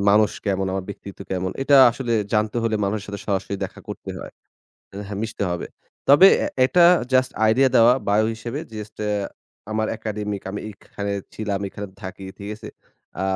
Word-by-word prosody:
মানুষ 105 +1 +5 0.2
কেমন, 95 -1 0
আমার 95 -1 -2
ব্যক্তিত্ব 100 0 -9
কেমন 95 0 -1
এটা 140 0 +5
আসলে 120 0 -3 0.2
জানতে 105 +1 +1
হলে 115 -1 0
মানুষের 100 +1 -2
সাথে 100 -1 -5
সরাসরি 100 -1 -1
দেখা - - -9
করতে - - -7
হয়। - - -8 0.6
এহ 100 0 -7
মিশতে 110 -2 -4
হবে। 90 - -3 0.4
তবে 145 +8 +9 0.2
এ - - 0 0.2
এটা 130 +7 +4 0.3
জাস্ট 130 0 +3 0.2
আইডিয়া 130 +5 +4
দেওয়া 115 +2 +7 0.2
বায়ো 105 +2 +3
হিসেবে। 115 +4 -5
জাস্ট 105 0 -7 0.7
আমার 110 0 0
একাডেমিক, 105 -2 -4
আমি 105 - -5
এখানে 100 0 -6 0.2
ছিলাম, 105 -2 -2
এখানে 105 +1 -7 0.2
থাকি। 95 0 -7
ঠিক 100 - -7
আছে? 105 0 -10 0.5
আ - - 0
105 Hz, 165 wpm, -23 LUFS, 100-115 Hz, 0.7 s, তবে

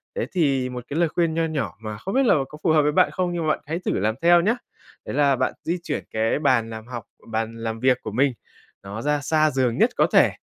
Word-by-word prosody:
Thế 485 - -1
thì 135 -8 +1
một 125 -1 -6
cái 145 - -3
lời 170 -2 +3
khuyên 170 0 0
nho 165 0 +1
nhỏ 140 - -3
mà 110 -1 -5
không 190 - -5
biết 270 +1 +3
là 235 - +5
có 150 - -10
phù - - +2
hợp 155 -1 +5
với 150 0 +2
bạn 180 +4 +3
không 180 -2 -1
nhưng 170 -2 -2
mà - - +2
bạn - - -5
hãy 165 +3 -2
thử - - +1
làm 110 +3 0
theo 170 +1 +6
nhá. 215 +7 +2 0.5
Đấy - - -5
là 140 -1 +4
bạn - - 0
di 170 +2 -1
chuyển 150 -4 -3
cái 110 +4 0
bàn 125 -6 +2
làm 110 0 -8
học 120 -3 -6 0.3
bàn 115 +1 -2
làm 115 0 -4
việc 130 +1 +3
của 110 - -6
mình, 130 +5 +2 0.5
nó 100 +3 -6
ra 150 +2 +1
xa 155 +1 +2
giường 125 -3 0
nhất - - +4
có - - +3
thể. - - +6
140 Hz, 270 wpm, -23 LUFS, 115-165 Hz, 0.5 s, theo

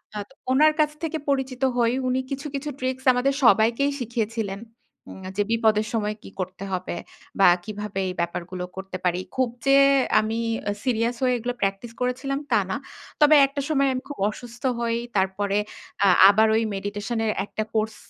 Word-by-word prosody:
আ - - -3
ত - - -29 0.2
ওনার 305 +4 +5
কাছ 300 -1 +3
থেকে 320 0 -1
পরিচিত 265 -2 -1 0.2
হই, 235 -1 +3 0.2
উনি 255 +1 +1
কিছু, 275 +2 -4
কিছু 290 +2 -3
ট্রিকস 260 0 -3
আমাদের 265 +3 +1
সবাইকেই 235 +5 +4
শিখিয়েছিলেন। 225 -3 -3 0.5
উম 190 - -10
যে - - +3
বিপদের 220 -1 +2
সময় 210 -1 -1
কী - - -10
করতে 185 +1 -5
হবে? 185 -1 -3 0.5
বা 195 - +6 0.2
কীভাবে 210 -1 -5
এই - - -4
ব্যাপারগুলো 175 +1 -3
করতে 190 -1 -6
পারি? 180 0 +1 0.2
খুব 255 -2 +1 0.2
যে 275 - +4 0.5
আমি 220 +1 -1 0.3
অ্যা 205 - 0
সিরিয়াস 235 -1 +1
হয়ে 250 -1 +3
এগুলো 245 +2 -3
প্র্যাকটিস 195 +4 -2
করেছিলাম, 265 +3 -1
তা - - +5
না। - - -1 0.5
তবে 300 +1 +7
একটা 280 +1 -4
সময় 275 -2 +2
আমি 255 - -3
খুব 290 - -7
অসুস্থ 240 +2 -10 0.2
হই, 230 -1 0 0.2
তারপরে 195 +1 0 0.5
আ - - +6 0.2
আবার 220 +2 +4
ওই 225 - +2
মেডিটেশন 205 +4 -3
এর 215 - +1
একটা 215 - -4
কোর্স 220 0 0
230 Hz, 175 wpm, -24 LUFS, 205-260 Hz, 0.5 s, তবে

